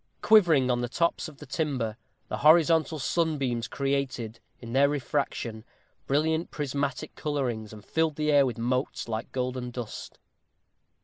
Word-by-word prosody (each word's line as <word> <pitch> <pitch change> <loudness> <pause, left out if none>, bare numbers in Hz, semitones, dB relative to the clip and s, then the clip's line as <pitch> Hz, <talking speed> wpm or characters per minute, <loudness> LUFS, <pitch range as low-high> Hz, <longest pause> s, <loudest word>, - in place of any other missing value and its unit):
Quivering 165 -12 +5
on 120 0 0
the 120 - -2
tops 170 +5 0
of 155 -3 -12
the 150 - -11
timber, 130 -6 -2 0.3
the - - -3
horizontal 160 +1 +5
sunbeams 135 -5 0
created, 135 -5 -2 0.2
in 115 -1 -8
their 140 +2 +5
refraction, 135 -6 -2 0.4
brilliant 160 +4 +1
prismatic 140 0 -3
colorings, 125 -8 -2
and 105 -1 -12
filled 160 -2 0
the 150 0 +1
air 145 -1 +6
with 120 -3 -4
motes 125 +3 -1
like 110 0 -4
golden 125 -1 -2
dust. 120 -2 -7
140 Hz, 140 wpm, -28 LUFS, 120-155 Hz, 0.4 s, air